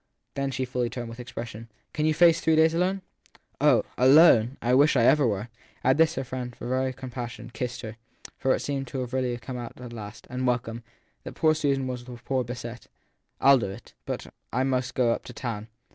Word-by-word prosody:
Then 140 Hz, 0 st, -1 dB
she 130 Hz, 0 st, -2 dB
fully 125 Hz, -1 st, -1 dB
turned, 120 Hz, -, -5 dB
and 115 Hz, -, -7 dB
with 115 Hz, +2 st, -10 dB
expression: 115 Hz, -2 st, -7 dB, 0.2 s
Can 155 Hz, 0 st, 0 dB
you 155 Hz, -, +3 dB
face 170 Hz, 0 st, +5 dB
three 160 Hz, -, +3 dB
days 160 Hz, +1 st, +5 dB
alone? 185 Hz, +3 st, 0 dB, 0.6 s
Oh -, -, +4 dB
" -, -, -30 dB
alone 135 Hz, -4 st, +6 dB
"! -, -, -45 dB
I 120 Hz, +1 st, +2 dB
wish 145 Hz, +3 st, +5 dB
I 120 Hz, -, +4 dB
ever 135 Hz, +2 st, +5 dB
were! 105 Hz, +1 st, -2 dB, 0.3 s
At 130 Hz, +2 st, +4 dB
this 160 Hz, 0 st, +4 dB
her 135 Hz, -, -2 dB
friend, 125 Hz, -1 st, -5 dB
as -, -, -21 dB
for 120 Hz, -, -6 dB
very 130 Hz, +1 st, 0 dB
compassion, 125 Hz, -2 st, -7 dB
kissed 125 Hz, -1 st, -4 dB
her; 110 Hz, -1 st, -8 dB, 0.4 s
for 130 Hz, -, +2 dB
it -, -, -5 dB
seemed 135 Hz, -2 st, -3 dB
really 130 Hz, -1 st, -2 dB
to 130 Hz, -1 st, 0 dB
have 120 Hz, -, -6 dB
come 125 Hz, +1 st, -6 dB
out 120 Hz, 0 st, -8 dB
at 125 Hz, -1 st, -8 dB
last 110 Hz, -1 st, -9 dB
and 125 Hz, +1 st, -2 dB
welcome! 120 Hz, -1 st, -1 dB, 0.4 s
that -, -, -8 dB
poor 155 Hz, -1 st, +4 dB
Susan 140 Hz, -3 st, 0 dB
was 125 Hz, -1 st, -5 dB
the 125 Hz, -1 st, -9 dB
worse 130 Hz, -3 st, 0 dB
beset. 120 Hz, 0 st, -7 dB, 0.5 s
I 140 Hz, -, +7 dB
ll 135 Hz, -, +5 dB
do 100 Hz, -, -2 dB
it! 100 Hz, +5 st, -11 dB
But -, -, -3 dB, 0.3 s
I 130 Hz, +2 st, +1 dB
must 130 Hz, -1 st, -1 dB
go 120 Hz, -2 st, +3 dB
up -, -, -2 dB
to -, -, -9 dB
town. 115 Hz, -4 st, -5 dB
125 Hz, 235 wpm, -26 LUFS, 120-135 Hz, 0.6 s, I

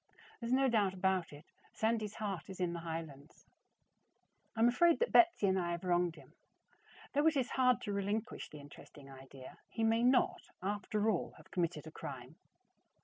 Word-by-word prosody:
There 235 Hz, -, -5 dB
is -, -, -3 dB
no 270 Hz, +1 st, +4 dB
doubt 205 Hz, -6 st, +2 dB
about 190 Hz, -2 st, 0 dB
it, 145 Hz, +2 st, -12 dB, 0.3 s
Sandy's 220 Hz, -1 st, -1 dB
heart 195 Hz, -7 st, -4 dB
is 190 Hz, -, -8 dB
in 175 Hz, -2 st, 0 dB
the 170 Hz, -, -4 dB
highlands. 160 Hz, -3 st, -7 dB, 1.1 s
I -, -, 0 dB
am 235 Hz, -, +7 dB
afraid 335 Hz, +8 st, +4 dB
that 480 Hz, -, 0 dB
Betsy 345 Hz, -, +5 dB
and 190 Hz, -1 st, +2 dB
I 175 Hz, -1 st, -1 dB
have 170 Hz, -, -5 dB
wronged 175 Hz, -2 st, +1 dB
him. -, -, -16 dB, 0.8 s
Though 290 Hz, +3 st, +3 dB
it 315 Hz, -2 st, +3 dB
is 255 Hz, -2 st, 0 dB
hard 255 Hz, -1 st, +3 dB
to 205 Hz, -, -3 dB
relinquish 205 Hz, +3 st, -3 dB
the 150 Hz, -, -10 dB
interesting 140 Hz, -1 st, -13 dB
idea, 135 Hz, 0 st, -12 dB
he 225 Hz, -, -3 dB
may 225 Hz, +1 st, +3 dB
not, 250 Hz, +1 st, +3 dB, 0.2 s
after 205 Hz, +2 st, -1 dB
all, 180 Hz, -, -2 dB
have -, -, -18 dB
committed 170 Hz, -4 st, -2 dB
a 160 Hz, -, -9 dB
crime. -, -, -8 dB
195 Hz, 185 wpm, -34 LUFS, 170-230 Hz, 1.1 s, am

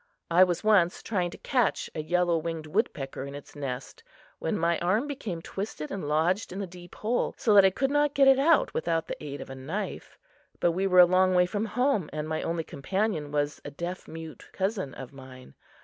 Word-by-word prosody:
I 175 Hz, +2 st, +7 dB
was 180 Hz, 0 st, 0 dB
once 195 Hz, -5 st, +3 dB
trying 185 Hz, -5 st, -1 dB
to -, -, -10 dB
catch 250 Hz, -6 st, 0 dB
a 155 Hz, -, -3 dB
yellow 175 Hz, +2 st, +1 dB
winged 165 Hz, -1 st, -3 dB
woodpecker 150 Hz, -, -2 dB
in 140 Hz, +1 st, -7 dB
its 145 Hz, -, -11 dB
nest 135 Hz, -, -6 dB, 0.4 s
when 210 Hz, -, -1 dB
my 170 Hz, -1 st, +1 dB
arm 190 Hz, +9 st, +1 dB
became 220 Hz, -, -5 dB
twisted 190 Hz, -6 st, -5 dB
and 190 Hz, -7 st, -4 dB
lodged 165 Hz, +8 st, +1 dB
in 185 Hz, -, -6 dB
the 200 Hz, -, -2 dB
deep 175 Hz, -1 st, -13 dB
hole 230 Hz, +3 st, -1 dB
so 215 Hz, -, +2 dB
that 200 Hz, -1 st, +8 dB
I -, -, +7 dB
could 270 Hz, +8 st, -1 dB
not 290 Hz, 0 st, +2 dB
get 275 Hz, -1 st, +5 dB
it 270 Hz, 0 st, +6 dB
out 315 Hz, +3 st, +4 dB
without 165 Hz, 0 st, 0 dB
the -, -, -7 dB
aid 145 Hz, -1 st, -6 dB
of -, -, -8 dB
a -, -, -6 dB
knife; 150 Hz, +11 st, -5 dB, 0.4 s
but 175 Hz, -, +3 dB
we 190 Hz, +3 st, 0 dB
were 180 Hz, -1 st, +7 dB
a -, -, +9 dB
long 185 Hz, +1 st, +3 dB
way 180 Hz, 0 st, +5 dB
from 205 Hz, +4 st, -2 dB
home 235 Hz, -, 0 dB
and 150 Hz, 0 st, -4 dB
my 155 Hz, 0 st, -2 dB
only 165 Hz, 0 st, -2 dB
companion 165 Hz, +1 st, -2 dB
was 145 Hz, 0 st, -1 dB
a -, -, -6 dB
deaf 170 Hz, +6 st, -6 dB
mute 160 Hz, -1 st, -9 dB
cousin 190 Hz, -, -2 dB
of 135 Hz, 0 st, -9 dB
mine. 130 Hz, -, -12 dB
175 Hz, 215 wpm, -28 LUFS, 155-205 Hz, 0.4 s, a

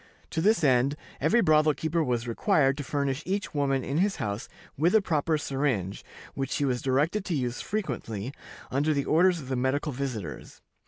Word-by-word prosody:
To 160 Hz, -, -1 dB
this 205 Hz, -1 st, +3 dB
end, 135 Hz, 0 st, +3 dB, 0.2 s
every 235 Hz, +2 st, +3 dB
brothel 155 Hz, -4 st, +4 dB
keeper 160 Hz, +1 st, 0 dB
was 120 Hz, -3 st, -1 dB
required 135 Hz, -, +2 dB
to 145 Hz, -, -3 dB
furnish 140 Hz, 0 st, -1 dB
each 195 Hz, +1 st, -2 dB
woman 135 Hz, -3 st, +1 dB
in 140 Hz, +4 st, -1 dB
his 195 Hz, +1 st, +2 dB
house 100 Hz, +1 st, -4 dB, 0.3 s
with 170 Hz, +8 st, +2 dB
a -, -, +8 dB
proper 155 Hz, -2 st, +1 dB
syringe, 135 Hz, -10 st, -1 dB, 0.3 s
which 135 Hz, -1 st, -3 dB
she 145 Hz, +2 st, 0 dB
was 125 Hz, -2 st, 0 dB
directed 150 Hz, +10 st, +1 dB
to 170 Hz, -, -1 dB
use 125 Hz, -3 st, -2 dB
frequently, 125 Hz, -, -4 dB, 0.4 s
under 145 Hz, +3 st, +1 dB
the 140 Hz, -, 0 dB
orders 175 Hz, +2 st, +4 dB
of 135 Hz, -, -9 dB
the 130 Hz, -, -1 dB
medical 130 Hz, +4 st, 0 dB
visitors. 120 Hz, -, -6 dB
140 Hz, 180 wpm, -27 LUFS, 130-160 Hz, 0.4 s, a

